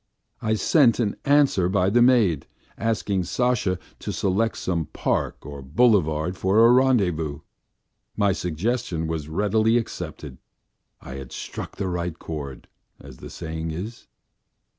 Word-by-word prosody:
I 110 0 +1
sent 115 - +4
an 105 -4 0
answer 140 -11 +3
by 95 0 +2
the 120 +3 +4
maid 115 - +3 0.3
asking 105 -5 -1
Sasha 120 -5 0 0.2
to - - -4
select 100 +4 0
some 85 -3 -1
park - - -2
or 70 -1 -8
boulevard 90 - +2
for 105 +5 +4
a 120 - +7
rendezvous. 90 - +2 0.8
My 100 -2 +3
suggestion 90 0 -2
was 80 -2 -4
readily 110 +6 +2
accepted. 115 - -6 0.6
I 65 - -8
had 65 -2 -9
struck - - -7
the 100 - -3
right 90 -2 -3
chord, 70 -6 -7 0.3
as 65 -2 -12
the - - -10
saying 80 -1 -5
is. 100 +9 -7
95 Hz, 135 wpm, -24 LUFS, 80-115 Hz, 0.8 s, a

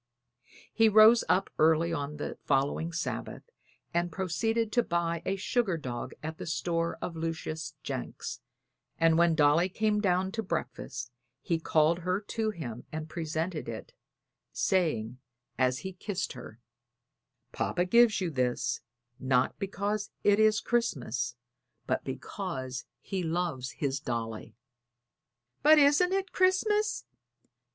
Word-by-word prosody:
He 225 -1 +5
rose 220 +2 +7
up 185 +3 +2
early 160 +2 +4
on 150 -1 -3
the 145 - -4
following 145 +4 +1
Sabbath 170 - -4 0.5
and 175 0 0
proceeded 220 +6 0
to 240 - +4
buy 170 -4 -1
a 195 - +1
sugar 195 -2 0
dog 125 -4 -5
at 160 +1 -5
the - - -6
store 165 0 -1
of 170 - -4
Lucius 160 -1 -4
Jenks, - - -5 0.6
and 165 -1 +4
when 170 0 +4
Dolly 155 +4 +4
came 210 +2 +1
down 190 -1 +1
to 225 +2 -2
breakfast 125 - -4 0.3
he 165 -2 -1
called 160 +1 +3
her 180 +2 0
to 220 +1 -2
him 125 - -6
and 155 0 -5
presented 160 +1 -3
it, - - -7 0.6
saying 130 - 0 0.4
as 130 0 +3
he 190 - -4
kissed 185 0 -3
her: 120 -3 -10 0.9
"Papa 175 0 0
gives 235 +2 +5
you 180 -3 -1
this, 125 -1 0 0.4
not 130 -1 +1
because 200 +1 -2
it 205 0 +4
is 215 -1 +4
Christmas, 130 - -1 0.5
but - - -1
because 130 0 -5 0.2
he 190 -2 -3
loves 165 -6 -2
his 140 -1 -2
little 125 -6 -2 0.2
Dolly." 110 - -10 1.1
"But 310 +2 +7
isn't 295 +5 +5
it 390 -1 -1
Christmas?" 420 +4 +2
170 Hz, 130 wpm, -30 LUFS, 150-210 Hz, 1.1 s, rose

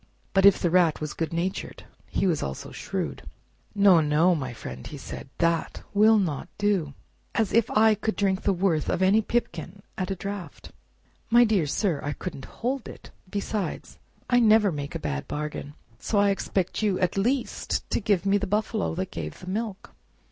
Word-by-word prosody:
But 195 0 +6
if 200 - +6
the 175 - +1
Rat 175 -3 +4
was 155 -1 -4
good 165 - -3
natured 175 +3 -3 0.3
he - - 0
was 170 -5 +1
also 65 -1 -5
shrewd. - - -4 0.5
"No, 200 -4 +6
no, 155 +4 +3
my 135 -6 -3
friend," 120 - -8
said - - -7
he, - - -29
"that 165 -1 0
will 215 +2 +6
not 165 -6 -1
do! 195 -9 0 0.4
As 220 -4 +1
if 230 -1 +3
I 220 +1 +5
could 215 +1 -2
drink 195 -1 +1
the 200 - +2
worth 175 -5 +1
of 190 - +1
any 200 +4 +5
pipkin 195 -5 -3 0.2
at 185 0 -2
a 195 - -1
draft! 195 -1 -7 0.6
My 240 +1 +7
dear 205 -9 +2
sir, 165 0 0
I 145 0 -2
couldn't 145 -7 -7
hold 255 +2 -3
it! - - -12 0.2
Besides, 200 0 -4 0.3
I 245 - +4
never 215 -3 +5
make 145 -2 -5
a - - -2
bad 70 -2 -3
bargain, 150 -1 -5 0.2
so 215 - -1
I 200 0 +4
expect 190 -1 -1
you, 205 -4 +1
at 180 -2 +1
least 240 +6 -1
to - - +2
give 200 -4 +1
me 200 +1 +3
the 200 - -3
buffalo 210 -2 -1
that 185 +1 -3
gave - - -6
the - - -11
milk." 215 -1 -4
190 Hz, 185 wpm, -26 LUFS, 165-210 Hz, 0.6 s, My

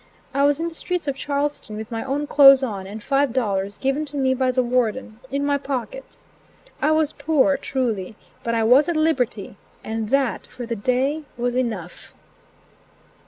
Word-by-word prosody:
I 280 +1 +3
was 290 +1 +2
in 335 - -1
the 335 - -6
streets 350 -1 -3
of 280 - -1
Charlestown 280 -6 -3
with 220 +2 -7
my 225 -1 -3
own 280 +2 -2
clothes 275 -2 +7
on 200 -6 -4
and 210 +2 -8
five 275 -1 +1
dollars, 200 -5 -1
given 275 +3 0
to 290 0 -7
me 260 -1 +2
by 260 0 +1
the 255 0 +1
Warden, 240 -2 -1
in 280 +1 -1
my 285 0 +1
pocket, 285 - -5 0.6
I - - +3
was 310 -1 +2
poor, 285 -1 +2
truly, 235 -8 -2 0.3
but 230 0 -1
I 225 - +1
was 260 +8 +5
at 340 - 0
liberty, 250 -11 0 0.3
and 220 -1 -3
that 270 -2 0
for 245 - -8
the 230 0 -3
day 260 +8 0
was 245 0 -1
enough. 220 -9 -4
260 Hz, 180 wpm, -22 LUFS, 230-285 Hz, 0.6 s, clothes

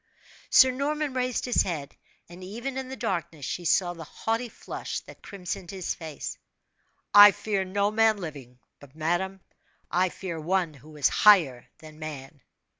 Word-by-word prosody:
Sir 260 - +7
Norman 290 +2 -2
raised 255 -1 -1
his 245 - +3
head; 155 -7 -4 0.3
and 175 +2 -12
even 235 +8 -5
in 265 -1 -4
the 265 - -5
darkness 170 - -3
she 175 - -4
saw 175 +1 +2
the 165 -1 -9
haughty 225 +9 -3
flush - - -6
that - - -15
crimsoned 185 -1 -6
his 190 -3 -3
face. 160 -4 -7 0.7
"I 205 0 +11
fear 200 -1 -2
no 200 +2 0
man 220 0 +3
living; 140 -9 -8 0.2
but, 145 0 -16
madame, 175 +4 -1 0.5
I 185 +1 +2
fear 175 -2 -6
One 175 0 0
who 150 +2 -15
is 145 - +4
higher 165 - +4
than 155 -1 -14
man!" 145 -2 -8
185 Hz, 160 wpm, -27 LUFS, 155-215 Hz, 0.7 s, I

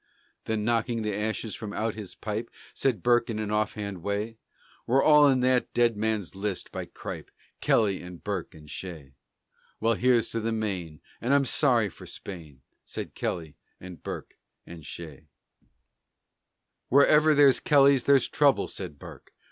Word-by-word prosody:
Then, 110 -1 -1
knocking 115 0 0
the 105 -2 -2
ashes 110 +1 -2
from 105 -2 -6
out 110 0 -1
his 105 -4 -8
pipe, 110 +2 -4 0.2
Said 120 -9 0
Burke 120 0 +3
in 110 - -2
an 105 -1 -3
offhand 105 -3 -2
way: 105 +4 -3 0.5
"We're 135 +3 +3
all 150 -1 +7
in 130 -2 +3
that 125 0 +2
dead 120 -2 +3
man's 105 -3 -1
list 100 -1 -4
by - - -5
Cripe! - - -8 0.3
Kelly 100 -4 +2
and 90 -1 -10
Burke 100 -6 -4
and 75 -1 -14
Shea." 75 -5 -8 0.7
"Well, 115 +1 +2
here's 120 0 +2
to 115 - -1
the 115 +1 -2
Maine, 95 -9 -3 0.2
and 125 +4 +2
I'm 140 -1 +3
sorry 120 -6 +3
for - - -13
Spain," 80 -8 -9 0.2
Said - - -7
Kelly 80 -4 -4 0.2
and 90 -2 -10
Burke - - -7 0.3
and 85 -2 -11
Shea. 80 -2 -9 1.6
"Wherever 150 +3 +5
there's 140 -2 +6
Kellys 140 -3 +4
there's 140 -2 +5
trouble," 145 -3 +3
said 90 -7 -7
Burke. - - -13
110 Hz, 155 wpm, -27 LUFS, 95-125 Hz, 1.6 s, all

